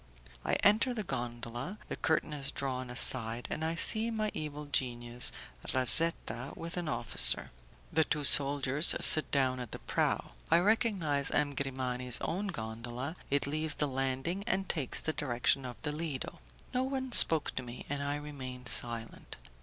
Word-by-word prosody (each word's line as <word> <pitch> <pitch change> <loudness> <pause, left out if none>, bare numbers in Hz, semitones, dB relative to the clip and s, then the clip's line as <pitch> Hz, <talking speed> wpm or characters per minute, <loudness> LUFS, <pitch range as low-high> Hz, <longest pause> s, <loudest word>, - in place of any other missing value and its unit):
I - - -3
enter 220 +5 +2
the 215 - -4
gondola, 120 - -7
the - - -6
curtain 155 -1 -2
is 140 -2 -2
drawn 130 -2 -5
aside, 120 -1 +1
and 160 - -4
I 165 +1 -3
see 220 +6 +4
my 215 -2 -3
evil 150 -1 -7
genius, 120 -3 -1 0.4
Razetta, 130 -1 +2
with 165 +1 -8
an 175 -3 -5
officer. - - 0 0.4
The 160 - +2
two 150 -1 -4
soldiers 140 +1 +7
sit 155 - +9
down 130 -2 -1
at 125 -3 -8
the - - -5
prow; - - -3 0.2
I 165 - +4
recognize 185 - 0
M. 145 -1 -1
Grimani's 130 -2 -3
own 195 +5 -4
gondola, 120 - -7
it 140 0 0
leaves 155 +1 -3
the 150 - -2
landing 135 +8 -4
and 190 -2 -2
takes 145 -8 -1
the 155 - -3
direction 130 -1 -1
of 125 -1 -9
the 150 - -3
Lido. 150 -3 -6 0.3
No 250 - -1
one 260 -1 -4
spoke 160 -9 +5
to - - -5
me, 125 0 -10
and 145 0 -5
I 140 0 -3
remained 130 -4 -6
silent. 115 -1 +1
140 Hz, 160 wpm, -30 LUFS, 125-165 Hz, 0.4 s, sit